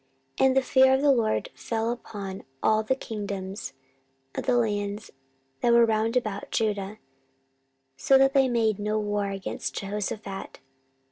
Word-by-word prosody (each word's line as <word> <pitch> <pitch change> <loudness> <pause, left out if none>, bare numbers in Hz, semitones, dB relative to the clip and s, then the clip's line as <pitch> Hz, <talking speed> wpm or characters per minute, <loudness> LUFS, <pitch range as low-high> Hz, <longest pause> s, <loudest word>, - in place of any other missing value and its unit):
14:017:010 - - +5
And 265 0 +2
the - - +6
fear 265 0 +5
of 265 - 0
the 290 - +6
LORD 230 -4 +1
fell 225 0 -2
upon 200 -5 -7 0.2
all 215 0 +4
the 220 +4 0
kingdoms 200 - -5 0.6
of - - -5
the 250 -1 +3
lands 205 -2 -1 0.5
that 235 - +3
were 235 0 +7
round 225 +2 +1
about 215 -5 -3
Judah, 210 -2 -1 1.0
so 270 - +5
that 270 0 +4
they 270 -2 +4
made 220 -4 +1
no 210 +1 -1
war 205 -1 -1
against 195 -1 -5
Jehoshaphat. 200 0 -5
215 Hz, 150 wpm, -26 LUFS, 205-240 Hz, 1.0 s, were